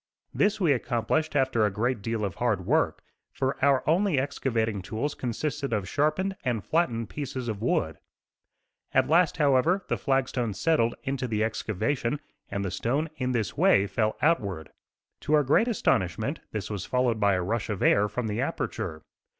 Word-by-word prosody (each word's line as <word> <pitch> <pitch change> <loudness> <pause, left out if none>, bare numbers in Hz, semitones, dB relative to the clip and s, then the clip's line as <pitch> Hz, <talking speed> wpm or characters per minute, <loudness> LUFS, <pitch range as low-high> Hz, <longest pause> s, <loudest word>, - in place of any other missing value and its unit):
This 205 +1 +2
we 175 -6 +3
accomplished 140 +6 -1
after 130 -5 +2
a 105 - +3
great 115 +3 -1
deal 110 0 -2
of 95 - -3
hard - - +1
work, - - +1 0.3
for 130 0 -2
our 140 -2 +3
only 175 0 +3
excavating 115 -6 -1
tools 115 +10 -3
consisted 135 +2 -3
of 100 -4 -1
sharpened 155 - 0
and 120 -6 -1
flattened 120 - 0
pieces 130 -4 -4
of 110 -3 -3
wood. 80 -9 0 1.0
At 130 0 +4
last, 165 +3 +3
however, 150 +6 +3
the - - 0
flag 135 -1 +1
stone 115 -5 -2
settled 120 +1 +2
into 135 -2 -2
the 110 -2 -2
the - - +4
excavation 115 +5 -1 0.3
and 100 0 -3
the 95 - -2
stone 145 +7 -1
in 130 -2 -1
this 115 -6 -1
way 100 - +4
fell 110 +2 -1
outward. 100 - 0 0.5
To 155 - +1
our 150 - +4
great 150 - +3
astonishment 120 - 0
this 110 -1 -4
was 100 -3 -3
followed 125 -2 0
by 100 -2 +3
a 90 - -1
rush 115 +4 -2
of 105 -3 -2
air 105 +1 +4
from 125 +1 -3
the 105 -1 -2
aperture. 80 0 -3
125 Hz, 175 wpm, -27 LUFS, 110-145 Hz, 1.0 s, At